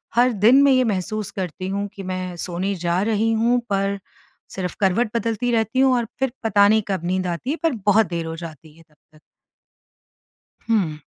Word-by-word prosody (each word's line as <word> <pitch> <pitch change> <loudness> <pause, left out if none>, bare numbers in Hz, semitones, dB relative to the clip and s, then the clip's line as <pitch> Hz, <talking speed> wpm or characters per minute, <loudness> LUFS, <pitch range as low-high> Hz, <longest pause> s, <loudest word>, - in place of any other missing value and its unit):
हर 245 +1 +4
दिन 255 +5 +7
मैं 280 - +5
ये 255 -1 +4
महसूस 215 -1 -2
करती 185 -1 -5
हूँ 200 +1 -2
कि 195 - -8
मैं 185 -1 -4
सोने 185 +3 -2
जा 175 +2 +1
रही 225 +1 +1
हूँ 235 +2 +2
पर 195 0 0 0.6
सिर्फ़ 180 -2 -4
करवट 205 +4 +2
बदलती 230 +1 -1
रहती 225 +2 0
हूँ 265 -1 +5
और 240 - 0
फिर 265 -2 0
पता 205 -2 +4
नहीं 220 +1 +4
कब 190 -4 -2
नींद 185 +1 -1
आती 175 +9 -4
है, - - 0
पर 325 - +3
बहुत 215 +2 +5
देर 170 -1 -3
हो 160 0 -5
जाती 160 -1 -11
है 165 - -17
तब 150 - -29 0.2
तक। 155 - -19 1.5
हुँ। 175 -9 0
200 Hz, 195 wpm, -22 LUFS, 180-230 Hz, 1.5 s, दिन